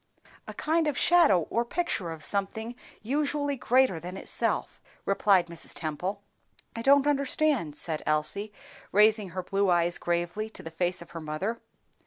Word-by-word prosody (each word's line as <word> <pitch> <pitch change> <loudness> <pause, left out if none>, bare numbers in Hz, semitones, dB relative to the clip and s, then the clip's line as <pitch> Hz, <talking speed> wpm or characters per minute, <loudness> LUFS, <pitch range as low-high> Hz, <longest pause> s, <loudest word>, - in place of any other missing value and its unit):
"A - - -7
kind 320 +1 +1
of 295 - -1
shadow 335 - +5
or 235 - +1
picture 235 - -2
of 160 -1 -7
something 220 +4 -1 0.3
usually 285 +3 0
greater 255 -7 +2
than 180 +3 -7
itself," - - -2 0.2
replied 195 -2 +3
Mrs. 170 -1 -6
Temple. 180 +6 -4 0.5
"I 230 - -4
don't 280 +3 +5
understand," 280 - +1
said 155 0 -1
Elsie, 155 +8 0 0.4
raising 210 -1 +4
her 185 +1 -5
blue 195 +1 0
eyes 175 0 +2
gravely 175 +5 -2
to - - -10
the 165 - -7
face 175 +1 -1
of - - -20
her 165 - -7
mother. 155 +10 -3
200 Hz, 155 wpm, -28 LUFS, 170-255 Hz, 0.5 s, shadow